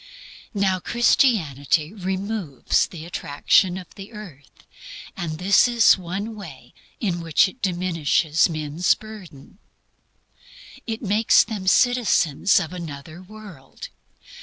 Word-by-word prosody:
Now 190 -2 +1
Christianity 170 - +1
removes 190 - -2
the 165 -3 -10
attraction 175 +3 +1
of 185 -2 -11
the 200 +3 -12
earth; 145 - -13 0.5
and 165 -2 -4
this 195 +7 +4
is 235 -2 +5
one 195 +5 -5
way 140 - -12 0.3
in 180 -6 -2
which 165 +3 +3
it 250 +7 -13
diminishes 170 -4 +1
man's 155 +2 0
burden. 200 -6 -13 1.3
It 225 +1 -4
makes 210 +2 +4
them 210 -4 -6
citizens 200 - +3
of 160 - -5
another 160 -1 -8
world. 195 -7 -12
185 Hz, 110 wpm, -22 LUFS, 155-210 Hz, 1.3 s, is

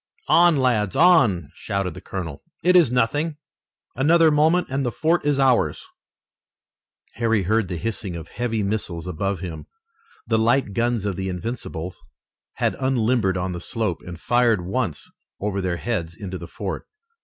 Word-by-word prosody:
"On, 175 -1 +6
lads, 115 -8 +1
on!" 120 - +4
shouted 100 -3 -3
the 95 - -10
colonel. 85 -8 -6 0.2
"It 180 +1 +4
is 170 -9 +6
nothing! 145 +6 0 0.6
Another 160 +4 +5
moment 160 +4 +3
and 135 +1 0
the 120 - -1
fort 165 +7 +1
is 145 -1 +1
ours!" 120 - +2 1.3
Harry 115 -3 +2
heard 110 +2 +1
the 90 -1 -4
hissing 105 -2 -3
of 85 0 -8
heavy 115 -3 -2
missiles 100 -5 -3
above 90 +1 -2
him. 85 -4 -6 0.6
The 115 -1 +1
light 115 -1 +2
guns 120 -2 0
of 100 -3 -2
the 95 0 -2
Invincibles 90 -3 -5 0.5
had - - 0
unlimbered 120 -7 +1
on 90 +1 -2
the 85 -1 -5
slope, 110 -4 -2
and 85 -2 -9
fired 120 -6 +2
once 95 - -2 0.3
over 100 -1 -2
their 90 -2 -1
heads 85 -7 -3
into 95 0 -6
the 85 - -8
fort. 95 +3 -5
110 Hz, 155 wpm, -23 LUFS, 90-130 Hz, 1.3 s, On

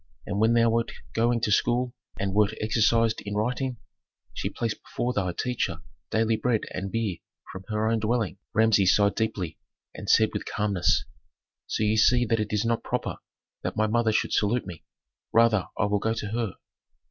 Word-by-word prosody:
And 100 0 -2
when 110 +2 +4
thou 115 0 +4
wert 115 0 0 0.2
going 115 +1 +2
to 105 - 0
school 120 +4 +2 0.2
and 100 -1 -2
wert 105 +1 +2
exercised 110 +1 +2
in 105 0 -4
writing, 125 +4 -1 0.6
she - - -3
placed 115 -2 -3
before 125 +1 -3
thy 95 -5 0
teacher 125 +5 -2 0.3
daily 110 0 +2
bread 120 -2 +1
and 100 0 -4
beer 110 -6 -1 0.3
from 95 0 -9
her 110 0 0
own 115 0 +2
dwelling." 110 -3 -1
Authentic. - - -41
Rameses 105 -4 +5
sighed 100 -2 +3
deeply 100 -7 -2 0.3
and - - -7
said - - +5
with - - -3
calmness, 100 -5 +1 0.6
"So - - -1
ye 110 +1 +2
see 120 +3 +4
that 115 0 +1
it 105 -1 -2
is 105 +1 0
not 115 0 +1
proper - - -2 0.4
that - - -4
my 110 - +3
mother 110 +1 +2
should 110 - 0
salute 115 +4 +1
me. 85 -4 -9 0.5
Rather 115 -4 +4
I 110 - +2
will 105 0 +1
go 110 +2 0
to 105 -2 -4
her." 115 -3 -2
110 Hz, 185 wpm, -26 LUFS, 105-115 Hz, 0.6 s, Rameses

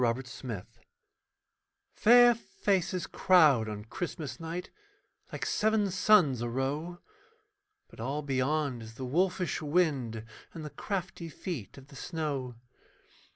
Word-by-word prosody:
A 115 -2 +3
PORTRAIT 125 -5 -7 1.3
Fair 240 +2 +7
faces 190 -5 -1
crowd 150 -12 +4
on 105 0 -6
Christmas 160 +3 -5
night 165 +2 -5 0.6
Like - - -4
seven 215 -2 +1
suns 180 - +4
a 120 - -2
row, 145 +8 -2 0.9
But - - -17
all 140 +6 -2
beyond 135 -1 0
is 110 0 -10
the 130 - -5
wolfish 180 +6 0
wind 145 -9 0 0.3
And 160 -2 -6
the 150 - -7
crafty 180 +1 -4
feet 150 - -6
of 135 +1 -14
the - - -14
snow. 140 -5 -3
150 Hz, 120 wpm, -30 LUFS, 125-180 Hz, 1.3 s, Fair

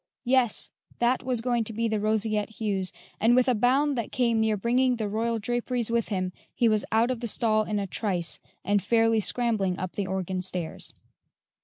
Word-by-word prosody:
yes, 250 -3 +1 0.3
that 240 +2 +2
was 250 -3 -1
going 240 -1 +1
to 225 - -6
be 230 +2 0
"The 220 -1 0
Roseate 215 0 0
Hues," 195 -4 -1 0.3
and 230 +3 +4
with 255 0 +4
a 255 - +4
bound 265 +6 +2
that 230 - -4
came 235 -3 +1
near 220 -1 +2
bringing 250 +4 +2
the 220 -3 -2
royal 225 +3 -1
draperies 240 +1 -1
with 235 -1 0
him 185 -3 -2 0.2
he 235 - +3
was 215 -2 +2
out 230 +3 +3
of 250 - -3
the 235 - -3
stall 215 -1 +1
in 210 0 -2
a 200 - -1
trice 185 -3 -1 0.3
and 205 +1 +2
fairly 225 +2 +3
scrambling 215 -5 0
up 185 -1 -4
the 200 -2 -3
organ 185 -1 -2
stairs. 180 -3 -3
220 Hz, 195 wpm, -27 LUFS, 205-240 Hz, 0.3 s, and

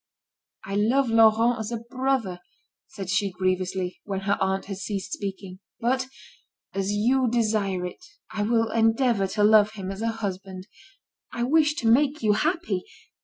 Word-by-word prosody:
"I 195 - -6
love 235 +5 +2
Laurent 225 +1 +4
as 220 +1 -4
a 235 - -2
brother," 240 -5 -2 0.5
said 200 -8 -8
she 195 +2 +1
grievously, 185 0 -2
when 195 -2 -4
her 200 +1 +1
aunt 190 0 0
had 195 -1 -6
ceased 195 -1 -4
speaking. 190 -2 -6 0.2
"But, 255 +2 0 0.7
as 195 +1 -1
you 245 +5 +2
desire 215 -6 0
it, 180 - -8 0.3
I 220 -1 -3
will 225 +1 +1
endeavour 225 -2 +2
to 205 +2 0
love 215 0 +5
him 195 -3 -5
as 195 +2 -7
a 230 - 0
husband. 195 -4 -5 0.7
I 240 - -3
wish 300 +3 +3
to 235 - -2
make 280 +4 +3
you 210 -1 +4
happy. 300 - 0
215 Hz, 160 wpm, -25 LUFS, 195-235 Hz, 0.7 s, love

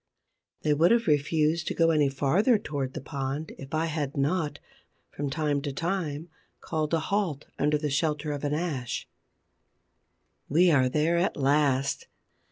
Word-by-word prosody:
They 150 - +3
would 160 +4 +4
have 235 0 +3
refused 155 +2 +1
to - - -2
go 165 0 +4
any 150 -3 +3
farther 170 - +3
towards 140 -9 -4
the - - -5
pond 140 +2 -4
if 135 0 -9
I 160 +1 +1
had 150 -3 -3
not, 150 +2 0 0.5
from 145 -1 -3
time 145 0 0
to 140 0 -3
time, 165 -1 -3 0.3
called 155 0 -1
a - - +1
halt 170 -4 -1
under 150 +1 +2
the 150 -1 -2
shelter 150 0 0
of 145 -1 -4
an 145 0 0
ash. 145 -8 -3 1.4
We 170 +4 +5
are 130 -4 +4
there 160 +5 +2
at 180 - 0
last. 140 -1 +1
150 Hz, 160 wpm, -27 LUFS, 140-165 Hz, 1.4 s, We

